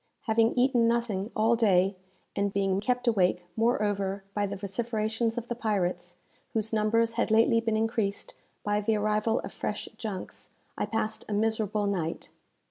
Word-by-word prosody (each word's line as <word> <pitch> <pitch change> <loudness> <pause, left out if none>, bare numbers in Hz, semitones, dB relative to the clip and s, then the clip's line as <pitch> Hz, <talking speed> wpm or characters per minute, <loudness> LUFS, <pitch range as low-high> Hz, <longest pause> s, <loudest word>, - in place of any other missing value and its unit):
Having 225 -2 +2
eaten 245 -2 +4
nothing 230 -4 0
all 225 +2 +4
day, 195 -4 +3 0.4
and 200 0 0
being 195 -1 +1
kept 250 +3 -1
awake, 180 -5 +2
moreover, 205 -4 0
by 205 -1 0
the 200 - -4
vociferations 225 +3 -1
of 240 - -2
the 240 - -3
pirates, 180 -6 -1 0.4
whose 220 0 0
numbers 225 +2 +2
had 235 - 0
lately 230 +1 +4
been 225 -1 0
increased 220 -2 -1 0.3
by 205 0 +1
the 220 +1 +1
arrival 215 +1 +1
of - - -7
fresh - - -3
junks, 205 -5 -6 0.3
I - - -2
passed 220 -1 -2
a - - -1
miserable 215 -1 +1
night. 175 -5 -2
215 Hz, 155 wpm, -28 LUFS, 200-230 Hz, 0.4 s, eaten